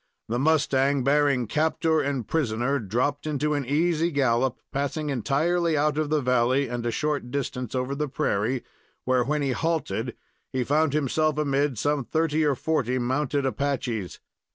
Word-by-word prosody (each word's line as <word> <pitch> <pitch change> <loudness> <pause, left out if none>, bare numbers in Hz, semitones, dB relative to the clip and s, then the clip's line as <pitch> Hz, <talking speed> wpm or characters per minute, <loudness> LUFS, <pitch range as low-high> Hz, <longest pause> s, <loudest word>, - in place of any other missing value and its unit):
The 120 +2 0
mustang 140 -2 +2
bearing 140 -2 +3
captor 160 - +1
and 140 -5 -2
prisoner 135 -2 0
dropped 130 +8 -1
into 150 0 0
an 140 -4 -2
easy 165 +3 +2
gallop, 130 -4 +1
passing 145 +2 -2
entirely 155 +6 +1
out 150 +1 +1
of 155 -1 -1
the 155 -1 +2
valley 125 +2 +2
and 120 0 -4
a - - +2
short 145 0 -1
distance 125 -2 -3
over 130 +1 -1
the 150 +1 -2
prairie, 115 +1 -1 0.4
where, 130 -1 +3
when 150 +3 -1
he 135 - 0
halted, 125 -7 -2 0.4
he 130 -1 0
found 150 +3 +2
himself 150 +1 +1
amid 140 -3 +1
some 145 +3 0
thirty 160 +3 0
or 145 -2 +2
forty 130 -3 0
mounted 135 +3 0
Apaches. 130 -8 -2
140 Hz, 155 wpm, -25 LUFS, 125-150 Hz, 0.4 s, bearing